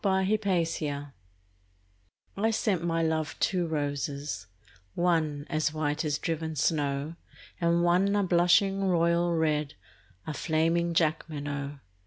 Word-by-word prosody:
The 200 - +2 0.2
White 195 -5 +1
Flag 145 -2 -2 1.3
I 220 +3 +1
sent 205 -5 0
my 165 -1 0
love 160 -1 -1
two 180 -3 +1
roses, 145 - -3 0.5
one 160 -5 +1
As 155 -1 0
white 155 0 -1
as 150 -2 0
driven 160 0 -3
snow, 145 +1 0 0.4
And 170 0 +2
one 185 +4 +3
a 205 - +2
blushing 190 +2 +3
royal 170 -1 +2
red, 150 -3 0 0.5
A 155 - -4
flaming 165 +2 +1
Jacqueminot. 145 -3 -1
160 Hz, 120 wpm, -28 LUFS, 150-175 Hz, 1.3 s, one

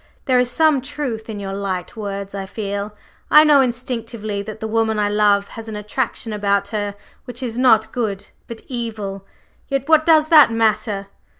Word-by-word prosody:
There 255 -3 +3
is 250 -1 +2
some 310 0 +3
truth 260 -5 -5
in 210 -2 -5
your 195 -1 -5
light 195 -1 -4
words; 200 -2 -5
I 195 -1 -5
feel, 205 0 -4 0.3
I 300 - +8
know 295 -3 +6
instinctively, 230 -4 -3
that 215 +1 -8
the 220 - -4
woman 220 0 0
I 205 -1 +1
love 205 -1 +2
has 225 0 -9
an 220 - -6
attraction 210 +1 -3
about 200 -1 0
her 205 -2 -3 0.3
which 250 0 -5
is 240 -1 -3
not 220 -4 +4
good, 215 -6 -3 0.2
but 230 -1 -8
evil; 215 -6 -5 0.4
yet 275 -1 -2
what 315 -1 +5
does 315 -1 +4
that 305 -7 +7
matter? 215 -2 0
220 Hz, 180 wpm, -20 LUFS, 205-250 Hz, 0.4 s, I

